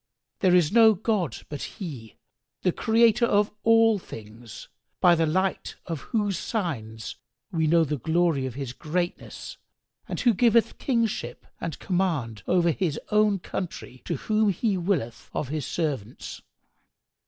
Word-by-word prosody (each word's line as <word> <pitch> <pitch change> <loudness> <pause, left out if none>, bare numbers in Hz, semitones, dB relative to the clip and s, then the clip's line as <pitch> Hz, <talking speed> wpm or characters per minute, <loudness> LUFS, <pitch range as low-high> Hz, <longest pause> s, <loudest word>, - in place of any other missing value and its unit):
There 185 -2 +4
is 175 -3 +4
no 225 -1 +7
god 200 - -1
but 145 -2 -6
He, 135 - -7 0.5
the 180 - +3
Creator 230 +3 +3
of 205 -1 +2
all 225 -2 +5
things, 110 - -11 0.3
by 180 -2 +6
the 165 -1 +2
light 185 +4 -1
of 165 -4 -4
whose 205 -6 -1
signs 115 - -4 0.3
we 160 -3 +1
know 165 +1 +5
the 150 -2 -2
glory 160 -1 +1
of 125 - -7
His 135 -3 -5
greatness 175 +5 -4 0.5
and - - -4
who 240 -3 +4
giveth 230 +1 +3
kingship 230 -5 -1 0.2
and 165 - -4
command 160 - -1
over 175 -2 +3
his 160 -3 -1
own 210 -1 +4
country 170 -8 -6
to 170 - -1
whom 215 - +1
He 200 +2 0
willeth 170 - -2
of 135 - -2
His 150 -1 -3
servants! 140 - -4
175 Hz, 140 wpm, -26 LUFS, 145-210 Hz, 0.5 s, no